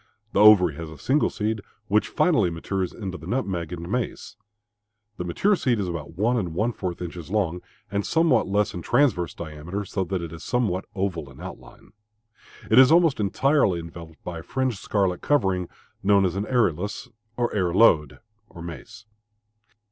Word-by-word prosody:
The - - +2
ovary 105 -6 +7
has 80 -1 -6
a 80 - -11
single 135 - +1
seed 110 0 -2 0.3
which 105 +1 +2
finally 115 - +2
matures 90 +2 -3
into 95 -5 -6
the 80 - -10
nutmeg 95 -8 -2
and 85 -1 -6
mace. 120 +4 -3 0.8
The - - -3
mature 190 - +2
seed 125 - 0
is 100 - -1
about 80 -1 -6
one 120 +5 +2
and 90 -7 -3
one 115 +6 0
fourth 90 -4 -4
inches 85 -1 -7
long 90 -4 0 0.3
and 100 0 0
somewhat 160 -6 +2
less 105 +1 +1
in 90 - -5
transverse 90 - +1
diameter, 85 +5 -6
so 95 0 -2
that 90 -1 -3
it 85 -1 -7
is 80 - -9
somewhat 110 -7 0
oval 90 -7 -2
in 65 - -15
outline. - - -11 0.8
It 110 - +7
is 130 +2 +8
almost 165 -5 +4
entirely 105 - +2
enveloped 85 -1 -11
by 85 -2 -5
a - - -10
fringed 130 -3 -2
scarlet 95 -4 0
covering 95 -11 +1 0.3
known 100 0 +4
as 90 - 0
arillus 100 - 0 0.3
or 120 -1 0
arillode 90 -5 +3 0.4
(mace). 85 +4 -9
95 Hz, 165 wpm, -25 LUFS, 85-110 Hz, 0.8 s, is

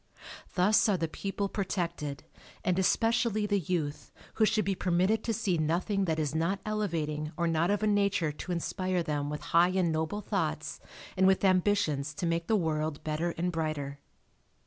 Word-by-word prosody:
Thus 210 +5 +4
are 195 - +3
the 165 - -1
people 200 +4 -3
protected 170 -8 -3 0.4
and 180 0 +2
especially 225 +2 +2
the 205 -1 +1
youth 155 -4 -3 0.2
who 220 - +3
should 215 -1 +1
be 195 - +1
permitted 185 +4 +1
to 230 - 0
see 200 -6 0
nothing 180 +6 0
that 160 -3 0
is 150 -2 -1
not 165 +5 0
elevating 160 -8 -2
or 170 - +1
not 165 +1 +1
of 205 +1 +1
a - - +3
nature 200 -6 +2
to 150 +5 -7
inspire 180 +1 -1
them 145 -2 -2
with 150 0 -4
high 170 +2 +6
and 185 -2 +1
noble 160 +6 -1
thoughts 160 -7 -2 0.4
and 190 0 +4
with 190 +1 +3
ambitions 180 -7 +2
to - - -3
make 165 0 0
the 220 - +3
world 155 -4 -1
better 160 +2 -1
and 180 +2 0
brighter. 155 -4 -3
175 Hz, 175 wpm, -30 LUFS, 155-200 Hz, 0.4 s, high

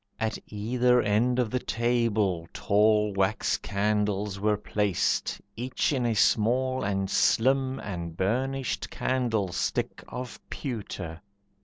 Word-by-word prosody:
At 110 0 -1
either 125 +4 +2
end 120 +3 +2
of 120 -4 +1
the 125 - 0
table, 110 -9 0
tall 105 0 +3
Wax 95 +2 +1
candles 105 -1 -1
were 105 +1 +2
placed, 105 -2 0 0.2
each 125 +5 -1
in 125 -3 +1
a 115 - +1
small, 125 +5 +2
And 95 -1 0
slim, 130 +6 +2
and 85 -4 -6
burnished 130 +7 -1
candlestick 115 -8 -1
Of 125 -1 -7
pewter. 95 - -5
110 Hz, 115 wpm, -27 LUFS, 100-125 Hz, 0.2 s, tall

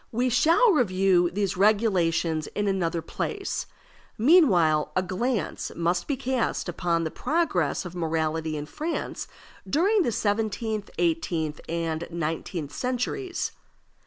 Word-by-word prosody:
We 245 +3 +1
shall 330 - +5
review 190 - +3
these 200 +1 -1
regulations 180 -6 +2
in 205 0 0
another 170 -4 0
place; 395 - -3 0.5
meanwhile 185 - +4
a 185 - +2
glance 200 +3 -2
must 170 +1 0
be 280 - -1
cast 255 -5 -1
upon 170 -1 0
the 160 - -3
progress 240 - 0
of 180 - -7
morality 160 -2 -1
in 145 - -4
France 315 - -4 0.4
during 395 +8 +3
the 275 - +1
seventeenth, 215 0 -1
eighteenth, 175 - -1
and 165 0 -2
nineteenth 165 -1 -3
centuries. 255 - -2
190 Hz, 120 wpm, -26 LUFS, 165-250 Hz, 0.5 s, shall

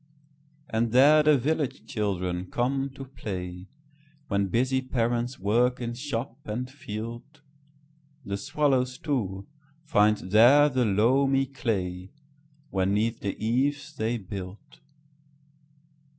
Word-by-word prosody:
And 115 +1 -1
there 145 +4 +7
the 150 -1 +5
village 145 +1 -2
children 90 -4 -2
come 135 +3 -1
to 135 - -8
play, 90 -8 -6 0.6
When 100 -2 +1
busy 130 +6 +1
parents 120 0 -1
work 120 +6 +1
in 120 -1 -3
shop 125 -1 -4
and 120 +4 -3
field. 120 +3 -8 0.8
The 100 - -3
swallows, 130 +1 0
too, 100 - -2 0.4
find 105 -7 +3
there 120 +11 +5
the 130 -3 +1
loamy 135 +7 +3
clayWhen 130 +2 -4
'neath 110 +3 0
the 100 - -4
eaves 140 +7 0
they 115 +1 -1
build. 100 +6 -9
120 Hz, 110 wpm, -27 LUFS, 105-135 Hz, 0.8 s, there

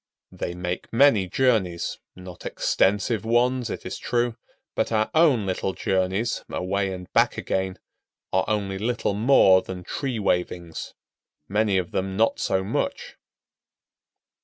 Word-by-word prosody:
They 85 - -5
make 90 0 -4
many 115 -6 +4
journeys, 95 -6 0 0.2
not 90 -1 -11
extensive 105 +3 +1
ones, 120 +2 +1
it - - -6
is - - -5
true; 120 -1 0 0.4
but - - -1
our 110 -1 +1
own 150 -10 +4
little 95 0 -2
journeys, 95 +6 -1
away 95 +1 -1
and 90 -1 -8
back - - +3
again, 95 -1 -2 0.6
are - - +2
only 100 -2 -1
little 115 -1 -1
more 100 -4 +5
than 90 -1 -7
tree 130 +4 -3
wavings—many 90 +1 -3
of 90 -2 -2
them 95 0 -2
not 115 +1 +2
so 95 0 0
much. 95 - -3
100 Hz, 130 wpm, -24 LUFS, 95-115 Hz, 0.6 s, more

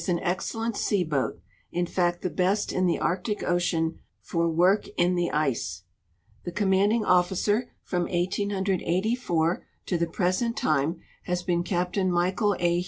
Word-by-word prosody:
an 175 -2 +1
excellent 225 +5 -2
sea 200 -3 +1
boat 150 -5 -1 0.2
— - - -38
in 175 - +2
fact 175 0 0
the 185 - 0
best 190 +3 +1
in 185 0 +2
the 170 - +2
Arctic 190 +4 -1
ocean 170 -2 0 0.2
for 170 -1 -1
work 180 +5 +3
in 175 +1 +3
the 175 -1 +1
ice. 120 - -1 0.6
The 175 - -4
commanding 205 +4 +2
officer 190 +6 +2
from 175 -2 -1
1884 190 0 0 0.2
to 180 - 0
the 170 - +1
present 185 +7 0
time 155 +3 +1 0.2
has 180 -1 -1
been 175 -2 +1
Captain 180 +1 0
Michael 185 +4 +1
A. 175 0 +2
180 Hz, 150 wpm, -26 LUFS, 175-195 Hz, 0.6 s, work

